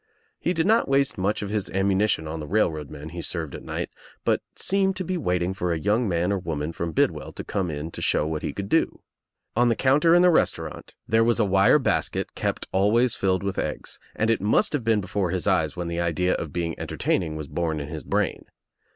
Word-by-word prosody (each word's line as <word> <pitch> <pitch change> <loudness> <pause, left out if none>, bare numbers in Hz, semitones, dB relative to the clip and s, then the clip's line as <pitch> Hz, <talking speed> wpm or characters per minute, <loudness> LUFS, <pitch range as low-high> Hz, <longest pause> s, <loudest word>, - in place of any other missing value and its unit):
He 180 - 0
did 160 - +1
not 225 +3 +3
waste 140 0 +2
much 100 +3 0
of 100 - -4
his 105 -2 -1
ammunition 95 -3 +1
on 80 +1 -4
the 75 - -6
railroad 80 -8 0
men 75 +1 -8
he 85 +2 -6
served 80 -4 -3
at - - -7
night - - -4 0.3
but - - +2
seemed 195 -1 +2
to 185 - -3
be 185 +1 -2
waiting 90 - 0
for 90 -2 -2
a 85 - 0
young 105 +7 +1
man 90 +2 +1
or 100 - 0
woman 80 -3 -3
from 85 0 -3
Bidwell - - 0
to - - -6
come 95 -3 -2
In 75 +2 -5
to - - -7
show - - +1
what 80 0 -2
he - - -2
could 100 -1 -5
do. - - +1 0.5
On 120 +2 +4
the 115 - +2
counter 150 +7 +4
in 175 - +6
the 180 - +6
restaurant 80 - -1
there 110 +1 +4
was 120 0 +2
a 110 - +4
wire 95 +7 +5
basket 135 - -1
kept - - -2
always 110 +6 +3
filled 95 0 0
with 100 -1 -2
eggs, - - -4 0.2
and 110 +1 +2
it 115 - +1
must 105 +8 +2
have 145 -5 0
been 110 -2 +2
before 95 -1 -1
his 90 -3 -2
eyes - - +1
when 90 -1 -3
the 85 0 -2
idea 85 +1 +1
of 80 - -3
being 85 0 -2
enter - - -5
taining 80 -4 0
was 75 -2 -5
born 80 -1 -2
in 70 - -5
his 80 -3 -6
brain. - - -1
95 Hz, 235 wpm, -25 LUFS, 85-115 Hz, 0.5 s, in